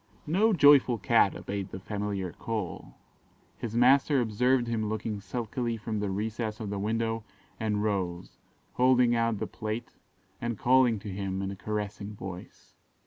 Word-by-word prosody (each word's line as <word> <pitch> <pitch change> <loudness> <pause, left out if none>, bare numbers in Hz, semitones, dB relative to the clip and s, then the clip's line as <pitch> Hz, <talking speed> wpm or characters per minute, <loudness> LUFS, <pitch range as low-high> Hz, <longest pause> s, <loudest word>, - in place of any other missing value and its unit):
No 195 +8 +3
joyful 145 - +6
Cat 90 - +3
obeyed 100 -1 -4
the 95 - -7
familiar 100 -2 -3
call: 110 -5 -5 0.6
his 115 -1 -4
master 135 +3 +5
observed 125 +2 +2
him 110 -2 -1
looking 110 -1 -3
sulkily 115 +3 -3
from 110 -1 -3
the 105 -1 -1
recess 110 +2 -3
of 105 -3 -4
the 100 - -2
window, 115 +2 -1 0.4
and 105 -2 0
rose, 90 -4 -2 0.3
holding 125 -1 +4
out 115 -1 +1
the - - -2
plate, 110 +1 -5 0.5
and 120 -2 -2
calling 125 -1 +4
to 105 +1 -7
him 95 0 -3
in 95 - -3
a - - -6
caressing 105 0 -4
voice. 95 -2 -9
110 Hz, 150 wpm, -29 LUFS, 100-120 Hz, 0.6 s, joyful